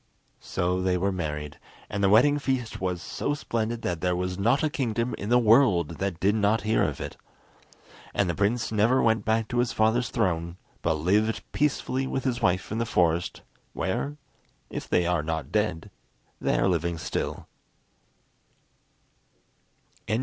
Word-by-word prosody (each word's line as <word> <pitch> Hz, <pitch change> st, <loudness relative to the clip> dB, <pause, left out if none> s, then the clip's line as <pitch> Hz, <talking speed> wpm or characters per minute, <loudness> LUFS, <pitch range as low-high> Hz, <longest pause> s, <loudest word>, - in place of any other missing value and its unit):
So 90 Hz, +1 st, -1 dB
they 90 Hz, -1 st, +1 dB
were 100 Hz, +2 st, 0 dB
married, 75 Hz, -5 st, -4 dB, 0.3 s
and 100 Hz, 0 st, -3 dB
the 100 Hz, -, +5 dB
wedding 145 Hz, +8 st, +5 dB
feast 130 Hz, -7 st, -2 dB
was 90 Hz, -2 st, -2 dB
so 145 Hz, -, -2 dB
splendid 115 Hz, -4 st, -3 dB
that 85 Hz, -2 st, -2 dB
there 90 Hz, -1 st, +1 dB
was 90 Hz, +1 st, -3 dB
not 120 Hz, +9 st, +2 dB
a 155 Hz, -, +2 dB
kingdom 120 Hz, -5 st, -1 dB
in 100 Hz, -, -4 dB
the 120 Hz, -, +5 dB
world 105 Hz, -, +4 dB
that 95 Hz, -4 st, -2 dB
did 100 Hz, +3 st, +3 dB
not 105 Hz, +1 st, +2 dB
hear 110 Hz, +1 st, +2 dB
of -, -, 0 dB
it. -, -, -6 dB, 0.9 s
And 100 Hz, -, +1 dB
the 85 Hz, -, 0 dB
prince 110 Hz, +5 st, 0 dB
never 110 Hz, +5 st, +3 dB
went 110 Hz, -2 st, +2 dB
back 110 Hz, 0 st, +1 dB
to 120 Hz, -, 0 dB
his 120 Hz, -1 st, +1 dB
father's 110 Hz, +2 st, +2 dB
throne, 85 Hz, -5 st, -1 dB, 0.2 s
but -, -, +1 dB
lived 105 Hz, +8 st, +1 dB
peacefully 135 Hz, -2 st, 0 dB
with 130 Hz, -, -2 dB
his 125 Hz, -2 st, -1 dB
wife 90 Hz, -1 st, +1 dB
in 110 Hz, -, -1 dB
the 115 Hz, -, 0 dB
forest, 85 Hz, -2 st, +1 dB, 0.3 s
where, 140 Hz, +10 st, -2 dB, 0.5 s
if -, -, -6 dB
they 90 Hz, -, +2 dB
are 90 Hz, -2 st, +1 dB
not 80 Hz, 0 st, -3 dB
dead, 80 Hz, -, -1 dB, 0.5 s
they -, -, +1 dB
are -, -, +2 dB
living 85 Hz, -2 st, 0 dB
still. -, -, -4 dB
100 Hz, 165 wpm, -26 LUFS, 90-120 Hz, 0.9 s, the